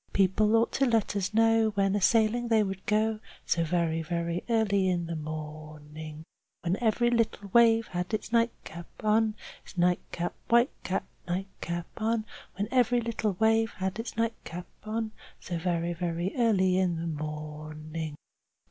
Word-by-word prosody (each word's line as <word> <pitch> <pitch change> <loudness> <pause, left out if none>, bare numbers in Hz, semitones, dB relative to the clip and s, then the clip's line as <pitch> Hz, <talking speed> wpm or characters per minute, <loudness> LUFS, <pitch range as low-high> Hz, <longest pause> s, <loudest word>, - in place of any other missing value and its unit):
People 200 +3 +3
ought 230 +1 +3
to 275 - +2
let 225 -3 +1
us 200 -1 -1
know 225 0 +4
when 195 0 +2
a 205 - 0
sailing 230 +3 +3
they 225 -2 +4
would 195 -1 -5
go, 215 +1 +2 0.3
So 170 - +1
very, 165 -1 0
very 170 +1 -2
early 200 -4 +2
in 175 -2 0
the 165 0 -4
morning." 155 0 -7
Chorus 155 +1 -17
When 180 +3 0
every 240 +2 +3
little 225 -4 0
wave 230 +1 +5
has 180 0 -2
its 215 0 -3
nightcap 230 -7 -1 0.2
on, 215 0 +3 0.3
Its - - -14
nightcap, 175 0 0
white 235 +3 +4
cap, 185 - -1 0.2
nightcap 175 -1 -3
on. 225 0 0 0.3
When 200 +3 -2
every 245 -1 +3
little 225 -3 -1
wave 225 +3 +2
has 190 0 -2
its 225 0 -5
nightcap 220 -6 -3 0.2
on, 220 0 -2 0.3
So 170 -2 -4
very, 170 0 0
very 170 +1 -2
early 190 -6 +3
in 180 -2 +1
the 165 +1 -4
morning. 155 0 -5
190 Hz, 155 wpm, -29 LUFS, 170-225 Hz, 0.3 s, wave